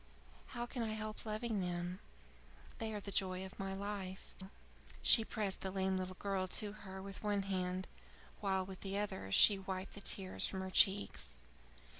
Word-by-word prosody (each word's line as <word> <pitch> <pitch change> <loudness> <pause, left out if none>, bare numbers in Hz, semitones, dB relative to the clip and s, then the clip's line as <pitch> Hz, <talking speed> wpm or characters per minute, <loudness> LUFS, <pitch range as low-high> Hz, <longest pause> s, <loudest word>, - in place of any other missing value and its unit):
How 240 - 0
can 240 0 -4
I 220 -1 -1
help 215 0 -5
loving 215 -1 -1
them! 175 +1 -2 0.8
They 225 -1 -2
are 210 - -2
the 200 0 -6
joy 185 -1 +1
of 190 - -11
my 195 0 -2
life!" 195 -1 -5 0.7
She 225 - +8
pressed 210 -4 -2
the 190 - -1
lame 190 0 +1
little 185 0 -3
girl 195 -2 0
to 205 +2 0
her 190 -2 -8
with 195 -1 -7
one 205 -2 +1
hand, 185 -1 -1 0.5
while 190 -2 +1
with 190 -1 -9
the 195 0 -2
other 95 - -2
she 200 - +7
wiped 190 0 -4
the 205 - -8
tears 190 -2 0
from 190 - -3
her 190 0 -4
cheeks. 190 - +4
195 Hz, 175 wpm, -37 LUFS, 185-205 Hz, 0.8 s, She